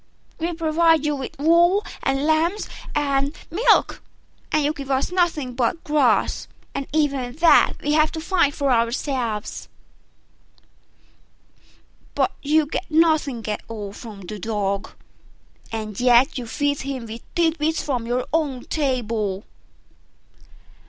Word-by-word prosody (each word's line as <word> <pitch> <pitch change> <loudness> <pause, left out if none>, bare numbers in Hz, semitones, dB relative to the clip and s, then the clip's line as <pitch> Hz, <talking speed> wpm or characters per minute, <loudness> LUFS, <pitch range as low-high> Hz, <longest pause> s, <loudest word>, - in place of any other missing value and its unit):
We 335 +2 -1
provide 325 -1 +2
you 300 -1 +1
with 270 -2 -7
wool 345 +7 +4 0.2
and 270 +1 0
lambs 325 +6 +1 0.3
and 280 0 0 0.2
milk 405 +9 +3 0.5
and 305 -1 +2
you 300 - +1
give 275 -2 -8
us 270 +4 0
nothing 325 -8 0
but 250 +6 -1
grass, 300 0 +2 0.3
and 275 - -4
even 280 -5 0
that 330 +2 +5
we 295 - 0
have 310 0 +3
to 320 - -4
find 335 -3 +2
for 280 -2 0
ourselves: 235 -2 -1 2.5
but - - +2
you 305 +2 +3
get 305 - -4
nothing 310 -7 +2
at 210 - -2
all 210 -3 -6
from 210 -3 -10
the 205 +3 -7
Dog, 200 -1 -2 0.8
and 215 -2 -5
yet 245 +3 +4
you 245 -3 -4
feed 285 +4 -1
him 270 -3 -5
with 225 +1 -8
tit 330 -2 +2
bits 315 +2 0
from 250 -5 -2
your 245 +1 -1
own 285 -6 -1
table." 230 -9 -1
280 Hz, 130 wpm, -22 LUFS, 235-315 Hz, 2.5 s, that